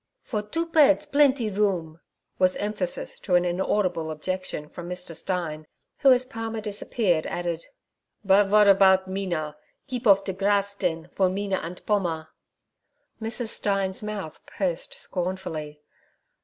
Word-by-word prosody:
'For 215 -4 -2
doo 325 +11 -2
bedts 310 -3 +4
plendee 275 -6 +3
room' 175 -6 0 0.4
was 185 0 +4
emphasis 205 -4 -2
to 180 - 0
an 175 0 +4
inaudible 180 -2 0
objection 155 -1 -4
from 175 +2 -8
Mr. 180 -2 -5
Stein, 155 -4 -3 0.3
who, 275 -2 +6
as 255 0 +5
Palmer 225 -2 -5
disappeared, 205 -4 -1
added: 170 -1 -3 0.6
'But 195 +1 +5
vot 210 +1 +6
erpout 190 -1 +6
Mina? 175 -6 -3 0.3
Keep 250 -3 -3
off 195 -1 +6
der 190 - -3
krass, 200 +1 +1
den, 170 -4 -2
for 190 -2 +2
Mina 195 0 -1
ant 175 +1 -7
Pommer.' 170 -7 0 0.9
Mrs. 225 +1 -3
Stein's 195 -3 -1
mouth 210 -7 -6
pursed 180 -4 -2
scornfully. 175 -5 -4
190 Hz, 135 wpm, -25 LUFS, 175-210 Hz, 0.9 s, who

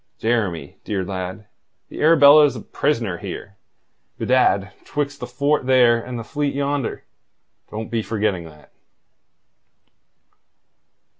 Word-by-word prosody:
Jeremy, 100 -11 -2
dear 100 -3 -2
lad, 95 +2 -5 0.4
the - - -7
Arabella's 150 -2 +7
a - - -6
prisoner 115 - -1
here, 100 -1 -8 0.6
bedad, 100 -7 +2
'twixt 145 -1 -3
the 125 - -6
fort 140 +2 0
there 120 -3 +5
and 125 -1 -6
the 115 - -5
fleet 145 +3 -2
yonder. 140 -2 -2 0.7
Don't 110 +1 -6
be 115 -1 0
forgetting 105 -5 -2
that." 75 -2 -16
115 Hz, 115 wpm, -21 LUFS, 100-140 Hz, 0.7 s, Arabella's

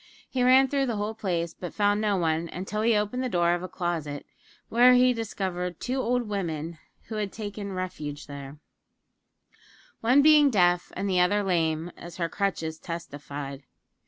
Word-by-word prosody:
He 255 - -2
ran 260 +2 +6
through 275 0 0
the 235 - -1
whole 210 +1 -2
place, 170 -6 -2
but 175 - -8
found 205 0 +2
no 205 -2 +1
one, 165 -1 0
until 195 +5 -3
he 225 0 +3
opened 210 +5 0
the 255 - -1
door 175 -3 +2
of 175 - -1
a 185 - -4
closet, 165 -5 -3 0.4
when 245 +2 +6
he 250 0 +5
discovered 185 -6 -3
two 255 +2 -2
old 245 -1 0
women 165 -5 -3 0.2
who 220 - -6
had 205 -2 -2
taken 205 -2 -6
refuge 150 -6 -5
there; 140 0 -9 1.4
one 255 +5 +4
being 300 -2 +7
deaf 175 -6 +2
and 200 - -2
the 185 -2 +2
other 205 +4 +3
lame, 165 -2 0
as 175 0 -10
her 170 -2 -1
crutches 165 -6 -2
testified. 145 -4 -6
185 Hz, 170 wpm, -27 LUFS, 165-220 Hz, 1.4 s, being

